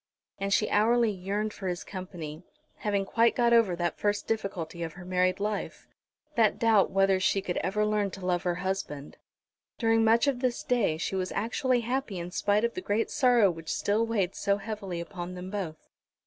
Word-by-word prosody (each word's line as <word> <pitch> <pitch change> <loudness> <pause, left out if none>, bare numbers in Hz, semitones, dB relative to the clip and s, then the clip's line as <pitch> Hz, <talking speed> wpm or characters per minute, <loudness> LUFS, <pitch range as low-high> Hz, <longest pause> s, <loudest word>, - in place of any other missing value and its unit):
And 195 0 -2
she 210 - +3
hourly 230 +2 +3
yearned 205 +3 -3
for 195 - -6
his 175 -1 -3
company, 175 -5 -7 0.4
having 200 -2 -1
quite 230 +3 +3
got 235 -1 +3
over 225 -6 +4
that 175 -1 -2
first 205 0 0
difficulty 180 -6 -3
of 165 -2 -4
her 180 0 -11
married 185 +1 +1
life, 205 0 -3 0.5
that 225 -5 +3
doubt 225 -4 +4
whether 195 0 +3
she 190 +1 +2
could 190 -2 -3
ever 210 +3 0
learn 210 -1 +1
to 190 - -8
love 175 -1 +1
her 175 -1 -1
husband. 150 -7 -4 0.6
During 225 -1 +3
much 225 +2 +4
of 275 -3 0
this 250 -2 -1
day 225 -11 +1
she 170 - -3
was 185 -1 -2
actually 245 +3 0
happy 240 -3 -2
in 175 +1 -5
spite 205 +3 +1
of 235 - -2
the 370 - -5
great 220 - -1
sorrow 240 -7 +4
which 165 -1 -6
still 210 +3 +1
weighed 205 -5 0
so 200 -1 0
heavily 200 -4 -5
upon 175 0 -6
them 180 +1 -7
both. 180 -7 -5
200 Hz, 190 wpm, -28 LUFS, 180-225 Hz, 0.6 s, over